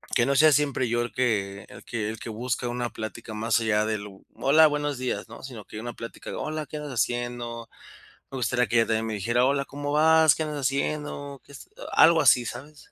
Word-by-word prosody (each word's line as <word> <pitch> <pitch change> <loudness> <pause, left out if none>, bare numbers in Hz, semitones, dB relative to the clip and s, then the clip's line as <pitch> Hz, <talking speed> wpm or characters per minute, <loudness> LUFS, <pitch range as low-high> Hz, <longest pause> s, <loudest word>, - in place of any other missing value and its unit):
que 120 - +4
no 140 +1 +1
sea 155 +2 +7
siempre 140 -4 +1
yo 120 +1 0
el 120 - -3
que 100 -5 -1
el - - -12
que 110 -3 -3
el 110 - -5
que - - -7
busca 120 +2 -3
una 120 0 -2
plática, 110 0 -7
más 110 +2 +1
allá 110 -2 +1
del: 105 -2 -3 0.3
"Hola, 155 +3 +5
buenos 145 -2 -2
días", 130 0 -3
¿no?, - - -11
sino 120 -6 -9
que 110 - -9
una 120 +1 -6
plática 115 - -9
de: - - -5
"Hola, 155 0 -3
¿qué 150 - -7
andas 150 -3 -6
haciendo?". 120 0 -2 0.6
Me 135 - -5
gustaría 125 -1 +1
que 115 - +1
ella 115 - +4
también 110 0 0
me 110 - -3
dijera: 115 +5 +1
"Hola, 140 +1 +1
¿cómo 145 +1 -5
vas? 160 0 +5
¿Qué 160 - -2
andas 150 -1 -4
haciendo? 140 0 -2
¿Qué - - -17
est?", 140 - -11 0.3
algo 165 +1 +6
así, 125 -4 +5
¿sabes? 145 +6 -9
125 Hz, 225 wpm, -26 LUFS, 115-145 Hz, 0.6 s, sea